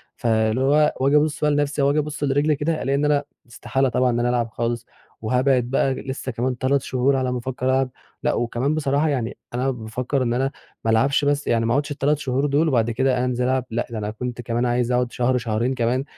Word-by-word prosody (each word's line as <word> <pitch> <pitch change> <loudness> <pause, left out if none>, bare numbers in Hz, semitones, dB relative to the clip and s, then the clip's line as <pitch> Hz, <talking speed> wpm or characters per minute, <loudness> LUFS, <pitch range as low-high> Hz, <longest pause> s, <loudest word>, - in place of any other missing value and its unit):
فاللي 110 -1 +1
هو 150 +3 +3
واجي 140 +2 +3
ابُص 150 0 0
بقى 150 0 +3
لنفسي 145 0 0
أو 140 - +4
اجي 150 - +1
ابُص 150 0 -4
لرجلي 145 +2 +2
كده 155 +3 -1
ألاقي 135 +1 0
إن 145 +1 +1
أنا 145 -1 +2 0.3
إستحالة 135 +3 -1
طبعًا 125 +1 +2
إن 120 - 0
أنا 120 +1 +1
العب 120 -2 0
خالص، 120 +1 -3 0.4
وهابعد 125 +3 +2
بقى 135 +2 +1
لسه 130 0 -5
كمان 125 +2 -1
3 140 +2 +4
شهور 130 +2 +1
على 130 -1 0
ما 125 - -1
افكر 130 +1 -4
العب، 130 0 +2 0.3
لأ - - +2
وكمان 120 +5 -1
بصراحة 145 0 +1
يعني 125 -5 -2 0.2
أنا 130 +2 0
بافكر 125 +3 -2
إن 120 - 0
أنا 135 +2 0 0.3
ما 115 - +3
العبش 140 +5 +2
بس 145 0 0
يعني 115 -1 +2
ما 115 - +1
اقعُدش 145 +1 0
ال3 145 +1 +1
شهور 135 -1 -1
دول 145 +3 +2
وبعد 120 -5 +2
كده 125 +1 +1
أنزِل 125 0 -1
العب، 130 0 +1
لأ، 115 +2 -2
ده 115 - -4
أنا 105 0 -3
كنت 125 +2 -5
كمان 120 +1 -1
عايز 120 0 +1
اقعُد 125 0 +1
شهر، 125 +1 +1
شهرين 115 +3 -1
كمان 125 +1 0
130 Hz, 225 wpm, -22 LUFS, 120-140 Hz, 0.4 s, أو